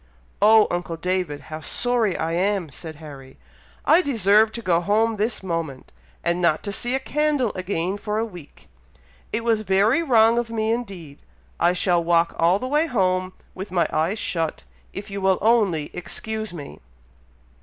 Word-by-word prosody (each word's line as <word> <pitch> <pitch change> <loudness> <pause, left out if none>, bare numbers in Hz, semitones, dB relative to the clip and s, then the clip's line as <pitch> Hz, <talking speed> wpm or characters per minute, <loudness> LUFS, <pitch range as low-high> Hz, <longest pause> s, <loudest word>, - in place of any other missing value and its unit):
"Oh, 215 +1 +7
uncle 175 -1 -3
David! 180 -4 -2
how 155 +3 -8
sorry 230 - +1
I 160 +1 -2
am!" 185 -2 0
said 160 +2 -8
Harry. 140 -3 -12 0.5
"I 335 - +6
deserve 220 - +3
to 235 - -5
go 170 -3 +2
home 220 +4 +1
this 215 0 -1
moment, 165 -7 -4 0.3
and 175 +1 0
not 170 -3 +2
to 200 - -3
see 240 +5 -1
a - - 0
candle 290 -4 0
again 185 +1 -3
for 210 0 -3
a 225 - 0
week. 175 -9 -13 0.6
It 225 +1 -1
was 225 -2 +1
very 210 - +2
wrong 235 -6 +4
of 240 -1 -3
me 220 -1 -1
indeed. 195 -11 -5 0.4
I 175 +1 +3
shall 175 -1 +1
walk 170 0 +2
all 170 +3 +4
the 255 - -5
way 300 +4 +1
home, 185 - 0 0.2
with 190 +2 -7
my 175 -2 +2
eyes 165 +7 0
shut, 165 -6 -2 0.3
if 200 0 -8
you 200 0 -4
will 190 -1 +3
only 200 -9 +2
excuse 220 +4 -4
me." 150 -5 -9
195 Hz, 170 wpm, -23 LUFS, 170-225 Hz, 0.6 s, Oh